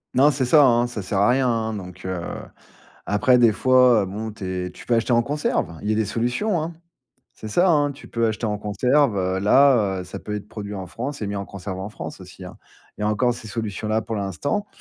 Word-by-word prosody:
Non 140 +4 +6
c'est 135 -2 -1
ça, 145 +4 +6
hein, 120 -1 +3
ça 115 -4 -6
sert 95 +1 -1
à 100 - +4
rien, 130 +1 +3
hein, 115 -2 0
donc 90 -2 -9
heu 95 -1 -3 0.9
après 125 +5 +3
des 120 -2 +6
fois, 125 -2 +4
bon 105 +4 -5
tu 105 -2 -9
es 90 -1 -3
tu - - -14
peux 120 - +2
acheter 115 +2 +1
en 120 - +5
conserve. 140 - -2
Il 105 - -4
y - - +2
a - - 0
des 110 - +1
solutions, 125 - -1
hein. 165 +2 -5 0.6
C'est 110 - -9
ça, 175 - +3
hein. 145 -3 +3
Tu 140 - -14
peux 115 -1 0
acheter 110 +1 -2
en 105 -1 -1
conserve, 125 +4 +2
heu, 95 0 0
là, 105 -3 +4
heu, - - -6
ça 95 +2 -8
peut 105 - -6
être 105 -1 -5
produit 105 -2 -7
en 95 -2 -6
France 130 +7 -6
et - - -1
mis 100 0 -3
en 100 0 -4
conserve 95 -1 -7
en 95 +2 -5
France 105 - -8
aussi, - - -11
hein. - - -11 0.4
Il - - -10
y - - -1
a - - +2
encore 120 +4 +2
ces 120 -2 -9
solutions-là 110 0 -2
pour 110 - -5
l'instant, 105 - -2
110 Hz, 245 wpm, -23 LUFS, 100-125 Hz, 0.9 s, Non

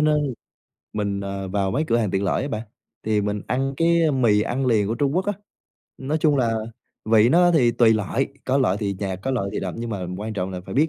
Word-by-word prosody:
nên 150 -4 +1 0.6
mình, 100 -2 -1
ờ, 100 -1 -4
vào 100 0 0
mấy 150 +8 0
cửa 115 - +3
hàng 105 -5 0
tiện 95 +1 0
lợi 95 - 0
á 140 - -3
bạn, 110 -3 -3 0.4
thì 105 -1 +1
mình 105 0 -2
ăn 135 +2 -1
cái, 170 0 +3
a, 155 - +3
mì 115 -6 +3
ăn 130 +4 -1
liền 110 -5 +3
của 115 - 0
Trung 140 +4 0
Quốc 190 +2 0
á, 205 - +1 0.7
nói 145 +4 -2
chung 150 -2 +3
là 120 -3 +2
à 115 - 0 0.5
vị 110 +1 +6
nó 175 +4 +5
thì 125 -8 +4
tùy 115 -1 +5
loại, 110 +6 -1 0.2
có 135 +1 +1
loại 115 -8 +2
thì 100 -2 -2
nhạt, 95 -2 -3
có 135 - -1
loại 115 -7 -1
thì - - -2
đậm 95 -2 -4
nhưng 115 0 -4
mà 95 -4 -3
quan 110 +1 -4
trọng 95 -1 -2
là 90 -1 -5
phải - - -6
biết 150 +4 +3
115 Hz, 260 wpm, -23 LUFS, 100-135 Hz, 0.7 s, vị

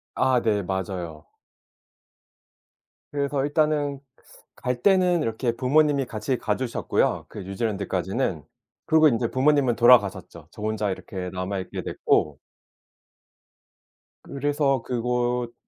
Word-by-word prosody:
아 130 -1 +2
네. 105 -2 +1
맞아요. 90 -4 -5 1.9
그래서 140 -1 -1
일단은 145 -2 0 0.6
갈 125 -1 -3
때는 180 -4 +3
이렇게 115 -1 -1
부모님이 140 +2 +2
같이 115 +2 -3
가 105 -2 -1
주셨고요 125 -1 -1
그 - - -9
뉴질랜드까지는. 95 - -2 0.4
그리고 160 0 +6
인제 115 -4 +1
부모님은 135 -2 +3
돌아가셨죠. 100 -9 +3
저 - - -12
혼자 110 -1 -1
이렇게 95 -1 -6
남아있게 95 +1 -4
됐고 75 -1 0 1.8
그래서 140 -2 0
그곳 120 0 -1
120 Hz, 255 characters per minute, -24 LUFS, 100-140 Hz, 1.9 s, 그리고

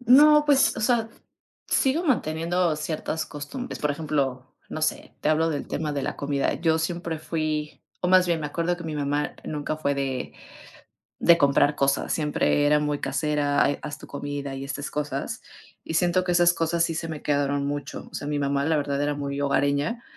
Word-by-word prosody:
No, 295 +5 +7
pues, 285 -2 +4
o - - -3
sea, 230 -1 +2 0.6
sigo 285 +6 +2
manteniendo 170 - +1
ciertas 155 +1 -3
costumbres. 205 - -6
Por 150 - 0
ejemplo, 140 -4 -2
no 155 - -5
sé, 155 - -2
te - - 0
hablo 160 +1 +3
del 145 -3 -3
tema 150 -1 -2
de 140 -1 -2
la - - -3
comida. 140 -1 0
Yo 160 -1 +1
siempre 170 0 -3
fui 155 -1 -3 0.2
o 180 - 0
más 185 0 +6
bien 170 -2 +1
me 150 - -2
acuerdo 170 +4 -1
que 175 - -9
mi 160 - -4
mamá 145 0 -1
nunca 150 0 -3
fue 140 -2 0
de 135 -2 -3 0.9
de 170 -1 +6
comprar 145 0 +4
cosas, 135 -1 +1
siempre 150 -1 +1
era 150 - +5
muy 150 -1 -1
casera, 145 -2 +1
ha - - +3 0.2
haz 150 0 -6
tu - - -11
comida 145 -1 -5
y 135 0 -5
estas 140 +1 -5
cosas. 145 -2 -3 0.4
Y 160 - -4
siento 180 +1 +2
que 180 - -1
esas 175 0 +5
cosas 165 0 +1
sí 165 - 0
se 165 +1 -3
me 155 -2 -6
quedaron 145 -1 +1
mucho. 145 0 -5
O - - -25
sea, 145 - -5
mi 150 0 -1
mamá 140 0 0
la 160 -1 +2
verdad 140 -1 -1
era 145 0 0
muy 140 0 -3
hogareña 145 - +1
150 Hz, 195 wpm, -25 LUFS, 145-170 Hz, 0.9 s, No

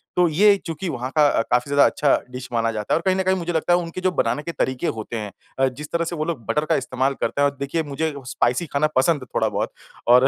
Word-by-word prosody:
तो 180 -1 +4
ये 200 +6 +5
चूँकि 165 +2 -4
वहाँ 125 -3 -3
का 150 -1 +6
अ, - - +2
काफ़ी 125 +3 +2
ज़्यादा 145 0 +5
अच्छा 145 -2 +3 0.2
डिश 125 0 -7
माना 115 -1 +1
जाता 105 -2 -2
है - - +4
और - - -3
कहीं 190 -1 +3
न 190 - 0
कहीं 190 0 +2
मुझे 175 -1 -3
लगता 165 +2 +2
है 175 - +4
उनके 170 +1 -5
जो 185 0 +2
बनाने 145 -1 0
के 170 - -4
तरीके 130 -5 -1
होते 110 +2 -5
हैं 105 -2 -5 0.3
अ, 135 - +4
जिस 145 +4 -7
तरह 170 0 0
से 170 - -4
वो 155 -1 -2
लोग 155 -9 -4
बटर 150 +7 0
का - - +2
इस्तेमाल 130 +1 0
करते 140 - 0
हैं 145 - +5
और 140 - -14
देखिए, 140 +4 -1
मुझे 155 +2 -2
स्पाइसी 125 +6 +1
खाना 145 +1 +1
पसंद 145 +3 +3
है - - -8
थोड़ा-बहुत - - 0 0.4
और 125 +2 +7
145 Hz, 275 wpm, -22 LUFS, 130-170 Hz, 0.4 s, और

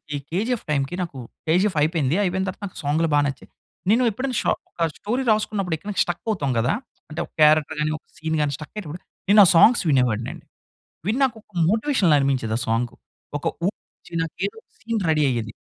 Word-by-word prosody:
ఈ - - -1
'కేజీఎఫ్' 225 +7 -1
టైంకి 140 +3 0
నాకు 165 -6 -7 0.3
'కేజీఎఫ్' 180 +2 +2
అయిపోయింది. 155 -3 +1
అయిపోయిన 190 +1 0
తర్వాత 185 - -9
నాకు 185 - -11
సాంగ్‌లు 155 +3 +1
బా - - +5
నచ్చాయి. 140 -1 -6 0.4
నేను 240 +3 +4
ఎప్పుడైనా 255 +4 -3
ఒక - - +2
షా - - +1 0.2
ఒక - - -28 0.2
స్టోరీ 245 +5 -2
రాసుకున్నప్పుడు 210 -5 0
ఎక్కడైనా 205 +5 -5
స్ట్రక్ 175 -1 -4
అవుతాం 150 -11 0
కదా! 125 +3 +2 0.4
అంటే 155 - -6
ఒక - - -26
క్యారెక్టర్ 155 0 +5
గాని 155 +1 +1
ఒక - - -23
సీన్ 160 0 -2
గాని 145 -1 0
స్ట్రక్ 150 +1 -10
అయ్యేటప్పుడు 180 -5 -6 0.3
నేను 205 +1 +8
ఆ - - +4
సాంగ్స్ 230 +8 +6
వినేవాడిని 125 -4 +2
అండి. 165 -2 -14 0.6
విని 220 +5 +1
నాకు 240 -4 0
ఒక 210 - -36 0.2
మోటివేషన్‌లా 220 - +3
అనిపించేది 130 -5 0
ఆ - - -4
సాంగు. 115 +2 0 0.4
ఒక - - -8 0.2
ఊపు - - +4 0.3
వచ్చి - - -19
నాకు 165 - -5
ఏదో 200 - -7
ఒక - - -72
సీన్ 225 -1 -2
రెఢీ 155 -2 +3
అయ్యేది. 115 -3 -3
165 Hz, 205 wpm, -23 LUFS, 145-210 Hz, 0.6 s, నేను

